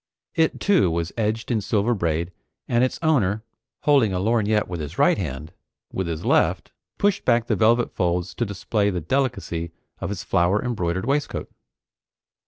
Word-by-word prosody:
It, 160 -1 +1
too, 190 - +3
was 85 +1 -2
edged 110 +1 -1
in 110 -3 +1
silver 105 +3 +1
braid, 85 -3 -1 0.4
and 120 +1 +2
its 130 - 0
owner, 110 -10 +2 0.4
holding 135 -9 +3
a 90 - 0
lorgnette 110 0 +1
with 90 -2 -5
his 75 -2 -6
right - - +4
hand, 75 +6 -5 0.4
with 95 -2 -2
his 80 -2 -4
left - - +2 0.3
pushed 205 -1 +1
back 120 -2 +3
the - - +1
velvet 115 +2 +3
folds 90 0 -1
to 120 - -2
display 100 0 0
the 90 -3 -2
delicacy 95 - -1 0.3
of 95 - -3
his 100 - -4
flower 90 +4 +2
embroidered 95 -5 -1
waistcoat. 145 +3 -1
105 Hz, 165 wpm, -23 LUFS, 90-120 Hz, 0.4 s, right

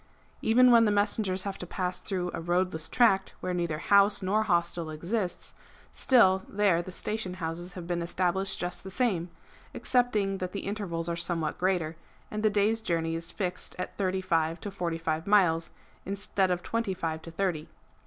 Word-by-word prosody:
^ - - -33 0.4
Even 250 +3 +5
when 230 -1 +7
the 210 - +3
messengers 205 -2 +1
have 200 -1 -5
to 180 - -6
pass 180 0 -3
through 180 -2 -2
a - - -4
roadless 175 -1 -1
tract 195 -6 +3
where 180 - -3
neither 170 -3 -1
house 200 +4 +4
nor 205 +4 +2
hostel 170 -4 0
exists, 175 +5 -3 0.4
still 190 -8 +4
there 195 -4 +2
the 185 - -8
station 190 -1 -3
houses 175 +1 -5
have 180 -2 -7
been 175 0 -2
established 185 +3 -1
just 175 0 -4
the 190 - -7
same, 190 -6 0 0.5
excepting 210 -6 +1
that 185 -1 -4
the 200 - -3
intervals 190 -5 -3
are 170 - -1
somewhat 170 -2 -2
greater, 175 -4 0 0.3
and 215 - -3
the 215 - +4
day's 210 +2 +2
journey 165 -5 -1
is 165 0 -4
fixed 180 -3 -3
at 180 - -5
thirty 190 -1 -1
five 165 -2 0
to 205 - -6
forty 175 -4 -2
five 160 0 -2
miles, 175 -5 +3 0.3
instead 195 -1 -1
of 180 -1 -1
twenty 230 -4 -1
five 160 -3 -3
to 165 - -9
thirty. 165 -3 -2
185 Hz, 185 wpm, -29 LUFS, 170-200 Hz, 0.5 s, when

